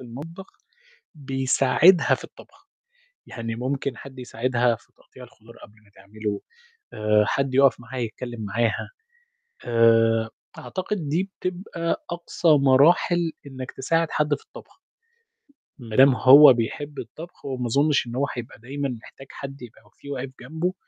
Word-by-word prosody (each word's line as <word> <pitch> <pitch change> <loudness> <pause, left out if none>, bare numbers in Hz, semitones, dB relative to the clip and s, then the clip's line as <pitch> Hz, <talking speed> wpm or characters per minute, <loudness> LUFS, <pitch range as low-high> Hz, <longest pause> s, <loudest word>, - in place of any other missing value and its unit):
المطبخ 150 +10 -10 0.7
بيساعدها 135 +5 +3
في - - -9
الطبخ، - - -17 0.6
يعني 115 -1 -6
ممكن 130 0 -3
حد 135 0 -12
يساعدها 125 -1 0
في 125 +3 -27
تقطيع 125 +1 -16
الخضار 115 -1 -18
قبل 105 - -15
ما 100 - -25
تعمله، 100 +1 -5 0.5
آآ، 105 0 +2
حد 135 +2 -1
يُقَف 135 -1 +4
معاها 125 +1 -7
يتكلّم 120 +1 -6
معاها. 115 +3 -1 0.8
آآ، 115 -1 +3 0.3
أعتقد 180 +5 -4
دي 180 +7 -1
بتبقى 175 -2 -3
أقصى 170 0 -2
مراحل 155 +4 +4
إنك 130 -2 -7
تساعد 165 +5 0
حد 150 0 +1
في - - -9
الطبخ. 440 - -15 1.0
ما 115 -4 -7
دام 135 0 +7
هو 135 +2 +9
بيحب 145 +5 -4
الطبخ 155 +9 -10
وما 130 -3 -3
أظنش 140 +2 +2
إن 120 - -7
هو 140 +2 +1
حيبقى 120 -3 -8
دايمًا 140 +4 -4
محتاج 135 - -14
حد 135 -1 -9
يبقى 115 -2 -13
في 140 - -12
واقف 135 -1 -5
جنبه، 160 +8 -3
130 Hz, 140 wpm, -24 LUFS, 120-150 Hz, 1.0 s, هو